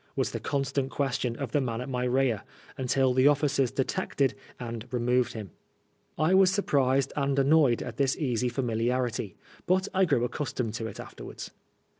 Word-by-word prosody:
was -, -, 0 dB
the -, -, -3 dB
constant 135 Hz, -1 st, -1 dB
question 130 Hz, -4 st, -1 dB
of 130 Hz, -2 st, -5 dB
the 145 Hz, -, +2 dB
man 115 Hz, -3 st, -2 dB
at 125 Hz, -, -5 dB
my 125 Hz, -2 st, -2 dB
rear, 125 Hz, -4 st, +1 dB, 0.3 s
until 130 Hz, 0 st, +1 dB
the 130 Hz, +2 st, +5 dB
officers 145 Hz, -3 st, +2 dB
detected, 140 Hz, 0 st, 0 dB, 0.3 s
and 115 Hz, -1 st, -6 dB
removed 125 Hz, 0 st, +1 dB
him. 105 Hz, -6 st, -7 dB, 0.7 s
I 155 Hz, +4 st, +2 dB
was 190 Hz, -1 st, +6 dB
surprised 140 Hz, -9 st, +1 dB
and 140 Hz, -1 st, 0 dB
annoyed 140 Hz, -3 st, +4 dB
at -, -, -7 dB
this 135 Hz, -1 st, +1 dB
easy 125 Hz, -5 st, 0 dB
familiarity, 120 Hz, -1 st, -1 dB, 0.3 s
but 185 Hz, +2 st, +2 dB
I 190 Hz, 0 st, +4 dB
grew 140 Hz, -8 st, +2 dB
accustomed 125 Hz, -3 st, -2 dB
to 115 Hz, 0 st, -3 dB
it 105 Hz, -, -9 dB
afterwards. -, -, -8 dB
130 Hz, 165 wpm, -28 LUFS, 120-140 Hz, 0.7 s, was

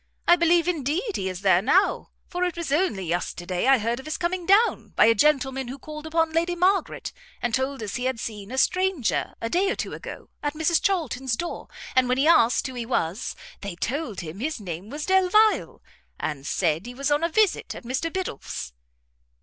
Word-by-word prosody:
I 345 Hz, -, +8 dB
believe, 340 Hz, 0 st, +3 dB
indeed, 350 Hz, -, -1 dB
he 190 Hz, -1 st, -1 dB
is 185 Hz, 0 st, -6 dB
there 190 Hz, -2 st, +4 dB
now, 360 Hz, -, +2 dB, 0.2 s
for 355 Hz, +1 st, -2 dB
it 360 Hz, -2 st, -1 dB
was 335 Hz, -5 st, -4 dB
only 290 Hz, -, +1 dB
yesterday 175 Hz, +3 st, -2 dB
I 270 Hz, 0 st, +7 dB
heard 230 Hz, +2 st, -1 dB
of 265 Hz, -, -10 dB
his 310 Hz, -, -2 dB
coming 350 Hz, 0 st, -2 dB
down, 415 Hz, +5 st, +3 dB
by -, -, +6 dB
a 230 Hz, -, +6 dB
gentleman 265 Hz, +1 st, +2 dB
who 260 Hz, +3 st, -6 dB
called 305 Hz, +3 st, -8 dB
upon 325 Hz, 0 st, +1 dB
Lady 340 Hz, +2 st, +1 dB
Margaret, 375 Hz, +3 st, +1 dB, 0.3 s
and 240 Hz, -1 st, -2 dB
told 265 Hz, -1 st, -1 dB
us 210 Hz, +3 st, -3 dB
he 245 Hz, -, -3 dB
had 260 Hz, -2 st, -1 dB
seen 210 Hz, -3 st, -6 dB
a 260 Hz, -, -5 dB
stranger, 370 Hz, -, +1 dB
a 230 Hz, -, -2 dB
day 370 Hz, +10 st, +1 dB
or -, -, 0 dB
two -, -, -4 dB
ago, -, -, -9 dB
at 290 Hz, +1 st, -2 dB
Mrs 320 Hz, +1 st, +2 dB
Charlton's 270 Hz, -, 0 dB
door, 345 Hz, +7 st, -5 dB, 0.3 s
and 255 Hz, -1 st, +4 dB
when 250 Hz, -, +2 dB
he 280 Hz, +3 st, +3 dB
asked 250 Hz, -8 st, +4 dB
who 260 Hz, -, -4 dB
he 245 Hz, -1 st, -4 dB
was, 215 Hz, -4 st, -2 dB, 0.3 s
they 200 Hz, -3 st, -5 dB
told 235 Hz, -, -3 dB
him 170 Hz, +3 st, -8 dB
his 295 Hz, +2 st, -2 dB
name 185 Hz, 0 st, -6 dB
was 295 Hz, +3 st, -5 dB
Delvile, 380 Hz, +3 st, +3 dB, 0.4 s
and 145 Hz, -2 st, -4 dB
said 170 Hz, +3 st, 0 dB
he 245 Hz, -, -8 dB
was 275 Hz, +3 st, -1 dB
on 295 Hz, +2 st, +2 dB
a 335 Hz, -, +2 dB
visit 420 Hz, +3 st, +1 dB
at -, -, -9 dB
Mr 260 Hz, +7 st, -2 dB
Biddulph's." 140 Hz, -, -5 dB
275 Hz, 205 wpm, -25 LUFS, 225-340 Hz, 0.4 s, I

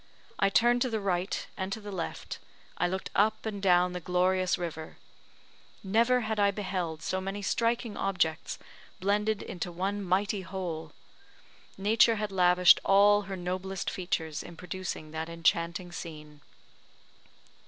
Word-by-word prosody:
I -, -, +4 dB
turned 240 Hz, +4 st, +4 dB
to 255 Hz, -, +2 dB
the 220 Hz, -2 st, -1 dB
right 185 Hz, -2 st, -1 dB
and 190 Hz, 0 st, -4 dB
to 220 Hz, -, -5 dB
the 205 Hz, -1 st, -8 dB
left, 180 Hz, -4 st, -5 dB, 0.4 s
I 175 Hz, -, +1 dB
looked 190 Hz, +2 st, -4 dB
up 215 Hz, +3 st, +2 dB
and 205 Hz, -2 st, -4 dB
down 180 Hz, -2 st, +4 dB
the 180 Hz, -, -3 dB
glorious 180 Hz, +1 st, +1 dB
river; 160 Hz, -2 st, -6 dB, 0.9 s
never 230 Hz, +6 st, +3 dB
had 220 Hz, -1 st, -2 dB
I 200 Hz, 0 st, +5 dB
beheld 185 Hz, -5 st, -3 dB
so 185 Hz, -, -1 dB
many 195 Hz, +2 st, -4 dB
striking 230 Hz, +2 st, 0 dB
objects 175 Hz, -4 st, -1 dB, 0.4 s
blended 210 Hz, +2 st, +1 dB
into 175 Hz, 0 st, -5 dB
one 195 Hz, +4 st, -2 dB
mighty 195 Hz, +2 st, +1 dB
whole! 175 Hz, -5 st, -5 dB, 0.9 s
Nature 220 Hz, +3 st, +4 dB
had 210 Hz, -1 st, -3 dB
lavished 180 Hz, -1 st, +6 dB
all 205 Hz, +1 st, +5 dB
her 195 Hz, -, -3 dB
noblest 185 Hz, +1 st, -3 dB
features 160 Hz, -4 st, -2 dB
in 170 Hz, -1 st, -11 dB
producing 180 Hz, -3 st, -5 dB
that 160 Hz, +1 st, -4 dB
enchanting 170 Hz, +2 st, 0 dB
scene. 150 Hz, -3 st, -9 dB
185 Hz, 145 wpm, -29 LUFS, 175-205 Hz, 0.9 s, lavished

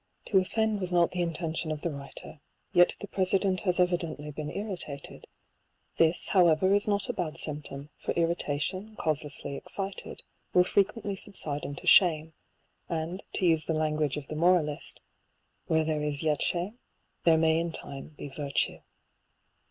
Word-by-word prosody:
To 195 Hz, -, +4 dB
offend 220 Hz, +2 st, 0 dB
was 185 Hz, -2 st, -2 dB
not 175 Hz, -1 st, +3 dB
the 180 Hz, -, -2 dB
intention 165 Hz, -1 st, -2 dB
of 150 Hz, -1 st, -4 dB
the 170 Hz, -, -1 dB
writer; 140 Hz, +2 st, -9 dB, 0.3 s
yet 175 Hz, 0 st, +5 dB
the 205 Hz, -, -6 dB
President 190 Hz, 0 st, +1 dB
has 180 Hz, -2 st, +1 dB
evidently 170 Hz, -4 st, 0 dB
been 150 Hz, +1 st, -5 dB
irritated; 180 Hz, -9 st, -5 dB, 0.7 s
this, 165 Hz, +1 st, +3 dB
how 185 Hz, -4 st, +5 dB
ever, 180 Hz, +4 st, +3 dB
is 205 Hz, +1 st, +2 dB
not 205 Hz, -1 st, 0 dB
a -, -, -2 dB
bad 165 Hz, -3 st, -3 dB
symptom, 145 Hz, -2 st, -1 dB
for -, -, -3 dB
irritation, 170 Hz, +4 st, -1 dB
causelessly 150 Hz, -3 st, 0 dB
excited, 195 Hz, +6 st, -4 dB, 0.3 s
will 180 Hz, -, +7 dB
frequently 200 Hz, +2 st, 0 dB
subside 155 Hz, -7 st, -1 dB
into 140 Hz, -1 st, -7 dB
shame; 160 Hz, -4 st, +5 dB, 0.6 s
and 170 Hz, +3 st, -3 dB
to 185 Hz, -, 0 dB
use 160 Hz, -3 st, +4 dB
the 160 Hz, -, 0 dB
language 155 Hz, -2 st, 0 dB
of 140 Hz, -2 st, -7 dB
the 155 Hz, -, -6 dB
moralist, 160 Hz, -3 st, +1 dB, 0.3 s
" -, -, -46 dB
Where 160 Hz, 0 st, +2 dB
there 155 Hz, -1 st, -1 dB
is 150 Hz, 0 st, -2 dB
yet 155 Hz, -2 st, +1 dB
shame, 185 Hz, +7 st, -1 dB, 0.4 s
there 165 Hz, -1 st, +5 dB
may 160 Hz, 0 st, +3 dB
in 170 Hz, 0 st, -2 dB
time 140 Hz, 0 st, -8 dB
be -, -, -6 dB
virtue." 140 Hz, 0 st, -2 dB
165 Hz, 160 wpm, -28 LUFS, 150-185 Hz, 0.7 s, will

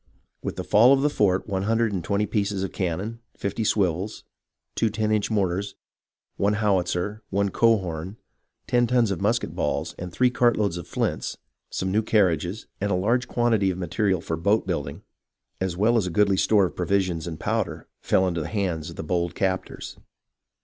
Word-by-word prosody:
With -, -, -4 dB
the -, -, -4 dB
fall 120 Hz, +6 st, +6 dB
of 135 Hz, 0 st, +2 dB
the 150 Hz, -, +2 dB
fort 95 Hz, -6 st, +1 dB
one 95 Hz, -2 st, -1 dB
hundred 115 Hz, +1 st, +1 dB
and 90 Hz, -3 st, -2 dB
twenty 100 Hz, +3 st, 0 dB
pieces 100 Hz, -2 st, -1 dB
of 95 Hz, -, -3 dB
can 85 Hz, -4 st, -1 dB
non, 110 Hz, +5 st, -5 dB, 0.2 s
fifty 100 Hz, +3 st, -2 dB
swivels, 95 Hz, -1 st, 0 dB, 0.5 s
two 115 Hz, -, +1 dB
ten 110 Hz, 0 st, -1 dB
inch 105 Hz, -1 st, +1 dB
mortars, 100 Hz, -1 st, -1 dB, 0.6 s
one 100 Hz, +1 st, +2 dB
howitzer, 100 Hz, -1 st, 0 dB
one 100 Hz, 0 st, +1 dB
cohorn, 95 Hz, -4 st, +1 dB, 0.5 s
ten 120 Hz, -1 st, +2 dB
tons 120 Hz, -3 st, +2 dB
of 95 Hz, -, -3 dB
musket 115 Hz, +4 st, 0 dB
balls, -, -, -1 dB, 0.2 s
three 125 Hz, +8 st, +2 dB
cart 120 Hz, -1 st, +3 dB
loads 100 Hz, -5 st, 0 dB
of 85 Hz, -, -7 dB
flints, -, -, -2 dB, 0.3 s
some 95 Hz, 0 st, -2 dB
new 105 Hz, +3 st, +3 dB
carriages, 95 Hz, -2 st, +1 dB
and 100 Hz, -, -1 dB
a 95 Hz, -, +2 dB
large 115 Hz, +7 st, +1 dB
quantity 115 Hz, -5 st, +2 dB
of 90 Hz, -, -2 dB
material 95 Hz, +1 st, 0 dB
for 80 Hz, -, -3 dB
boat 100 Hz, +7 st, +1 dB
building, 85 Hz, 0 st, -3 dB, 0.6 s
as 95 Hz, -2 st, -2 dB
well 110 Hz, +5 st, +3 dB
as 100 Hz, -5 st, +1 dB
a -, -, -1 dB
goodly 100 Hz, +2 st, +3 dB
store 100 Hz, +1 st, +4 dB
of 90 Hz, -, -5 dB
provisions 90 Hz, -2 st, 0 dB
and 80 Hz, -2 st, -6 dB
powder, -, -, -2 dB
fell 95 Hz, -, +2 dB
into 85 Hz, -2 st, -1 dB
the -, -, -4 dB
hands 90 Hz, -7 st, -2 dB
of -, -, -9 dB
the -, -, -5 dB
bold 85 Hz, +1 st, -1 dB
captors. 95 Hz, -1 st, -3 dB
100 Hz, 185 wpm, -25 LUFS, 90-110 Hz, 0.6 s, fall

